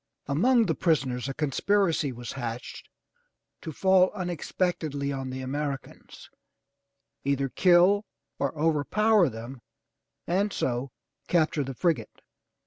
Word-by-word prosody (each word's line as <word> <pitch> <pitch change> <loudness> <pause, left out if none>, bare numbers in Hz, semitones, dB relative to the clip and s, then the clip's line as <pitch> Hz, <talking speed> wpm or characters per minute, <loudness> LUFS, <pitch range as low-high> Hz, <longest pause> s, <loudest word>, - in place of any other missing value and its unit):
Among 230 - +3
the 165 - +1
prisoners 135 -7 0
a - - -3
conspiracy 160 +1 +1
was 120 -1 -7
hatched 120 -2 -6 0.7
to 160 - -6
fall 190 +3 +4
unex 175 -4 -5
pectedly 145 -6 -1
on 135 -1 -5
the 130 0 -5
Americans, 140 +1 -5 1.0
either 140 0 0
kill 185 +6 +4 0.3
or 140 -1 0
overpower 170 +6 +3
them 120 +2 -9 0.6
and 195 +4 0
so 125 -2 -2 0.4
capture 155 -3 +2
the 135 -1 -6
frigate. 170 +4 -1
150 Hz, 115 wpm, -27 LUFS, 135-180 Hz, 1.0 s, fall